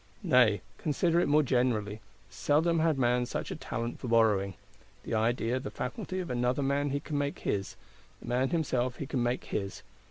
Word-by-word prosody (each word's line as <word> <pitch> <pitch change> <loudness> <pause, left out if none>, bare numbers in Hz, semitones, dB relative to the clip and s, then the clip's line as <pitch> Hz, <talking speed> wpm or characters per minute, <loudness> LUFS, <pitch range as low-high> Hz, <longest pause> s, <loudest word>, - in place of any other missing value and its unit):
_ - - -4
Nay, 110 -7 +5 0.2
consider 165 +3 +1
it - - +2
more 150 +1 +4
generally, 115 -5 0 0.3
seldom 160 +3 +1
had 160 -2 +2
man 125 -1 +2
such - - -4
a - - -3
talent 115 +1 -4
for 125 - -6
borrowing. 105 -5 +3 0.5
The - - -5
idea, 115 +2 +1
the - - -5
faculty 160 +8 -4
of 180 -7 -4
another 125 +3 0
man 140 +1 +1
he 140 +1 -1
can 145 0 -3
make 145 0 -2
his; 100 -1 -2 0.4
the - - -12
man 125 +2 +1
himself 130 -7 0
he 140 - -5
can 130 -2 -2
make 120 +1 0
his. 100 -1 -4
125 Hz, 190 wpm, -30 LUFS, 115-145 Hz, 0.5 s, Nay